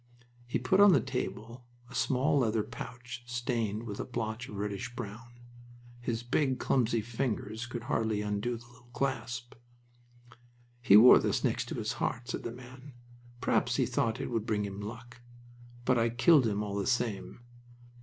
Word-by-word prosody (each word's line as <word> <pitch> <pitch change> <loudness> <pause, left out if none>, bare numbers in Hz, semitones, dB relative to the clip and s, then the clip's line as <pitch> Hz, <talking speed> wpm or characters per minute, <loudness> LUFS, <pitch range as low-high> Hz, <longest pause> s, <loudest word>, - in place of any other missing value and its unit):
He 120 - 0
put 125 +11 +2
on 205 -2 +8
the 140 - +5
table 125 -2 -5 0.2
a - - -14
small 130 +4 +2
leather 110 -3 +1
pouch 120 +2 -8
stained 120 -3 -2
with 105 -3 -6
a - - -1
blotch 115 -1 -4
of 105 - -8
reddish 105 +3 -4
brown. 120 +1 -8 0.6
His 120 -1 -3
big, 130 +2 +1
clumsy 120 -3 +1
fingers 115 0 -3
could 120 0 -6
hardly 110 -3 0
undo 105 +4 -2
the 120 - -14
little 120 0 -20
clasp. 130 -2 -3 1.3
"He 100 -4 +7
wore 120 +4 +9
this - - 0
next - - 0
his - - -2
heart," 120 +2 -2
said - - -3
the 115 - -5
man. 130 +3 -12 0.5
"Perhaps - - +1
he - - +2
thought 115 -1 0
it - - -4
would 115 -2 -1
bring 105 -2 0
him 100 0 -6
luck. 115 +3 -9 0.6
But 130 -2 +3
I 115 0 +2
killed 130 +2 +5
him 105 -1 -1
all 100 -1 -3
the 100 - -1
same! 120 -3 -1
120 Hz, 165 wpm, -31 LUFS, 110-125 Hz, 1.3 s, wore